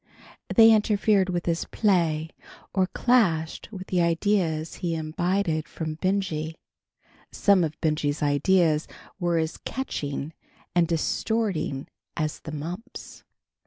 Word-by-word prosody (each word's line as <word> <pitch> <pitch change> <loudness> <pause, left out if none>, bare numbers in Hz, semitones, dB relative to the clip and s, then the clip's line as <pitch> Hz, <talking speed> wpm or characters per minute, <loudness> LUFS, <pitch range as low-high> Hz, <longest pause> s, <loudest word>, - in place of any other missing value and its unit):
They 225 -1 +8
interfered 210 -2 +3
with 175 -1 -2
his 170 -1 0
play 165 -6 +1 0.4
or 190 -1 +2
clashed 180 -10 +1
with 190 -3 -7
the 180 -2 +1
ideas 170 -2 0
he 170 -2 -2
imbibed 165 +1 -1
from 160 -1 -4
Benjy. 180 -5 -1 0.8
Some 200 -3 +4
of 155 -1 -3
Benjy's 150 -1 0
ideas 155 +2 +3 0.3
were 175 -2 +1
as 160 0 -1
"catching" 150 - -4 0.4
and 175 -1 +3
distorting 165 -3 -1 0.3
as 155 -2 -2
the 155 - -8
mumps. 175 +11 -7
170 Hz, 115 wpm, -26 LUFS, 155-195 Hz, 0.8 s, They